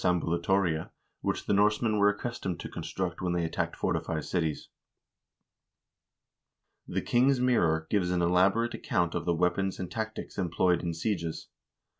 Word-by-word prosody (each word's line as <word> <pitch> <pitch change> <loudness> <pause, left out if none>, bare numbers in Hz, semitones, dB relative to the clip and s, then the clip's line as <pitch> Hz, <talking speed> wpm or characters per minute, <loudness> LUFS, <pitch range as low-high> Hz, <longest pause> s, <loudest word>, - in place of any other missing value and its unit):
turris 90 - +3
ambulatoria) 85 -1 0 0.3
which - - -2
the - - +1
Norsemen 105 +2 +3
were 100 0 +6
accustomed 105 -4 -3
to - - -5
construct 85 +2 -4
when 90 -1 0
they 85 -1 0
attacked 80 - -2
fortified 80 -2 -1
cities. 80 -3 -2 2.2
"The - - -2
King's 130 +2 +3
Mirror" 85 -11 +2
gives 95 -4 +2
an 90 -1 +1
elaborate 95 +7 +3
account 85 -2 0
of - - -2
the 85 - +2
weapons 90 +3 0
and 90 -2 -5
tactics 110 -2 -5
employed 90 0 +2
in 85 -2 -3
sieges. 85 -2 -3
90 Hz, 145 wpm, -29 LUFS, 85-105 Hz, 2.2 s, were